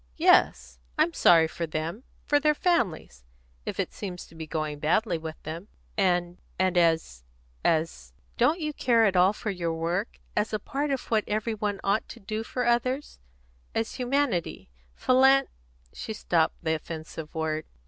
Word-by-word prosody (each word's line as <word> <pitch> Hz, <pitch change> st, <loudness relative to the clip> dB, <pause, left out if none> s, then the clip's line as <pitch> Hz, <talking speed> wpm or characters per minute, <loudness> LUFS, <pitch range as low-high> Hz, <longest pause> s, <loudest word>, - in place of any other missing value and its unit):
"Yes; 60 Hz, 0 st, +3 dB, 0.2 s
I'm 170 Hz, -, +3 dB
sorry 165 Hz, -2 st, +6 dB
for 170 Hz, +1 st, -4 dB
them 160 Hz, +9 st, -4 dB, 0.2 s
for 290 Hz, -, +3 dB
their 300 Hz, +1 st, +3 dB
families, 190 Hz, -, 0 dB, 0.4 s
if -, -, -4 dB
it -, -, -1 dB
seems 180 Hz, -3 st, -6 dB
to -, -, -19 dB
be 160 Hz, -1 st, -7 dB
going 155 Hz, -2 st, -3 dB
badly 170 Hz, +4 st, +1 dB
with 160 Hz, 0 st, -6 dB
them." 165 Hz, +5 st, -6 dB, 0.3 s
"And 175 Hz, -3 st, +1 dB, 0.2 s
and 185 Hz, 0 st, +1 dB
as 160 Hz, -, +2 dB, 0.4 s
as 155 Hz, -, 0 dB, 0.2 s
Don't 330 Hz, -, +3 dB
you 305 Hz, -2 st, -2 dB
care 235 Hz, -5 st, +3 dB
at 195 Hz, -3 st, +2 dB
all 180 Hz, +2 st, +5 dB
for 210 Hz, 0 st, -4 dB
your 170 Hz, -3 st, -2 dB
work 170 Hz, +6 st, -2 dB, 0.2 s
as 210 Hz, +1 st, 0 dB
a 215 Hz, -, 0 dB
part 285 Hz, +6 st, -2 dB
of 270 Hz, -3 st, -3 dB
what 215 Hz, -2 st, +3 dB
every 215 Hz, +2 st, -1 dB
one 205 Hz, -2 st, -2 dB
ought 200 Hz, +3 st, 0 dB
to -, -, -10 dB
do 215 Hz, +3 st, -4 dB
for 250 Hz, +2 st, -3 dB
others 255 Hz, +4 st, 0 dB, 0.6 s
as 225 Hz, 0 st, -1 dB
humanity, 250 Hz, -, -1 dB, 0.2 s
philan 265 Hz, +1 st, +5 dB, 0.3 s
" -, -, -34 dB
She 220 Hz, -, -5 dB
stopped 170 Hz, -6 st, +1 dB
the 160 Hz, -1 st, +1 dB
offensive 160 Hz, 0 st, -7 dB
word. 155 Hz, -1 st, -2 dB
180 Hz, 170 wpm, -27 LUFS, 160-230 Hz, 0.6 s, sorry